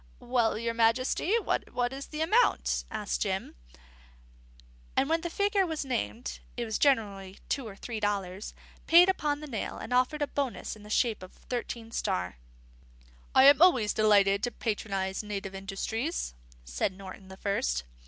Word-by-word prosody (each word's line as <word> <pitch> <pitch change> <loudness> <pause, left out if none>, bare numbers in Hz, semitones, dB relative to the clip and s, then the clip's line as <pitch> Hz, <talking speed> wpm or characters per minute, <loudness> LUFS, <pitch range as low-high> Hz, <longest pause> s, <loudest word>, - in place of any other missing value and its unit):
"Well, 240 -3 +1
your 230 +1 -2
Majesty, 235 - +2
what 245 - -1
is 275 +1 -7
the 305 0 -5
amount?" 430 +10 +2
asked 210 -1 -3
Jim; 190 -2 -2 1.4
and 270 - +3
when 325 +1 +1
the 345 - -3
figure 405 +2 +2
was 320 -5 -3
named 245 -1 -3 0.2
(it 240 - -1
was 220 -1 -2
generally 200 -8 +1
two 270 -5 -1
or 200 - -9
three 225 +2 -5
dollars), 200 -1 -2 0.3
paid 345 +3 +8
upon 295 -5 0
the - - -6
nail 230 -7 -4
and 245 - -5
offered 255 +4 +2
a - - -1
bonus 275 -6 -3
in 215 - -15
the 210 - -12
shape 220 -1 +1
of 185 - -11
Thirteen 235 -2 -5
Star. 90 - -2 1.0
"I 260 - +8
am 285 +2 +8
always 255 - +5
delighted 200 -2 +4
to 245 - 0
patronise 195 -4 -2
native 200 -2 -5
industries," 195 - -3 0.3
said - - -1
Norton 190 0 -10
the 190 0 -11
First. 65 - -1
225 Hz, 160 wpm, -29 LUFS, 200-275 Hz, 1.4 s, paid